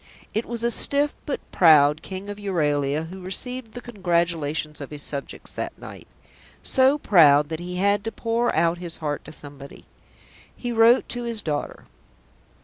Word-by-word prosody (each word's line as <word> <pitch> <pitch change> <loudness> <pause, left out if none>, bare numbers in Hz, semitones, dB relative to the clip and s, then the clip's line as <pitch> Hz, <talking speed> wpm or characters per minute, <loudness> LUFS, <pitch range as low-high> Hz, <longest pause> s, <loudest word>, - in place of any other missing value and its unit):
It 220 +2 -2
was 235 0 -5
a 235 - +2
stiff 285 +4 +3
but 285 - -3
proud 150 -3 +5
King 190 +1 -7
of 205 0 -7
Euralia 150 -5 -1
who 190 +1 -9
received 225 +5 -4
the 245 - -7
congratulations 170 -8 -2
of 140 - -7
his 150 -1 -2
subjects 140 -1 -4
that - - -5
night; - - -11 0.6
so 265 +2 +4
proud 150 - +5
that 160 -1 -4
he 180 +1 -6
had 200 +2 +1
to 225 - -2
pour 230 +1 -1
out 170 +1 +1
his 175 -2 0
heart 150 -2 -4
to 155 - -10
somebody. 140 -2 -11 0.7
He 245 - -4
wrote 230 +2 +4
to 245 - -4
his 235 -3 0
daughter. 150 -2 -4
180 Hz, 165 wpm, -23 LUFS, 150-230 Hz, 0.7 s, proud